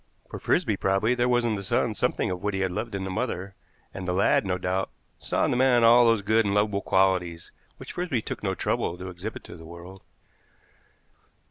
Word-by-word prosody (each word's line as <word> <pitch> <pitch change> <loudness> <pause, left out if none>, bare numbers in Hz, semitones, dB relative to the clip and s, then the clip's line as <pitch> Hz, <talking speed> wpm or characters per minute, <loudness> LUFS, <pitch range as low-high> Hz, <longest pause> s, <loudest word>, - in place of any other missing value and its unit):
For - - -6
Frisby - - +1
probably 95 +5 +1
there 125 0 +1
was 120 -1 +2
in 115 - +1
the 100 - -3
son 95 - 0
something - - -1
of 90 -1 -4
what 105 -1 -2
he 95 - -1
had 95 -1 0
loved 110 +2 -4
in 95 - -3
the 95 - -4
mother; 100 -3 -3 0.4
and 95 - -6
the 90 - 0
lad, 100 +1 +2
no 90 -1 0
doubt, 95 +1 -2 0.3
saw - - 0
in - - 0
the - - +1
man 125 -2 +4
all 120 +1 +7
those 115 -3 +2
good 110 +3 +3
and 100 -1 -1
lovable 105 -1 +1
qualities 90 -4 +1 0.3
which - - -9
Frisby 175 -9 -1
took - - -5
no - - -1
trouble 85 - -1
to 95 +1 -7
exhibit 90 +5 -7
to - - -11
the 80 - -12
world. 85 +3 -11
100 Hz, 220 wpm, -26 LUFS, 95-115 Hz, 0.4 s, all